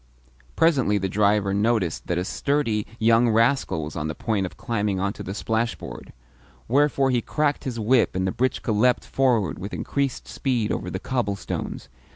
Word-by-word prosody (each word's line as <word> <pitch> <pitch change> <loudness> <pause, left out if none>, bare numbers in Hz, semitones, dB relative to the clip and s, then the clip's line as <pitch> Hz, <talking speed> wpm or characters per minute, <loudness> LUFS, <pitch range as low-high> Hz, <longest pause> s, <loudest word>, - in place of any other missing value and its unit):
Presently 135 -11 +3
the 95 -1 -1
driver 100 0 +2
noticed 100 -4 0
that 90 - 0
a 90 - -1
sturdy 115 -5 0
young 115 +1 +4
rascal 115 - +2
was 75 - -7
on 75 -1 -2
the 75 - -4
point 100 0 -1
of - - -13
climbing 105 -4 -1
onto 100 +3 -2
the 95 - -5
splashboard; 115 +2 -3 0.6
wherefore 140 +1 +3
he 120 -2 +2
cracked 150 +1 -1
his 120 -3 -3
whip 115 0 +2
and 95 0 0
the 95 - 0
britchka 130 0 -1
leapt 120 +4 +2
forward 125 -7 +1
with 100 +3 -5
increased 140 -2 -2
speed 120 -6 -1
over 90 - -3
the 95 - -3
cobblestones. 100 -2 -3
110 Hz, 170 wpm, -24 LUFS, 100-125 Hz, 0.6 s, young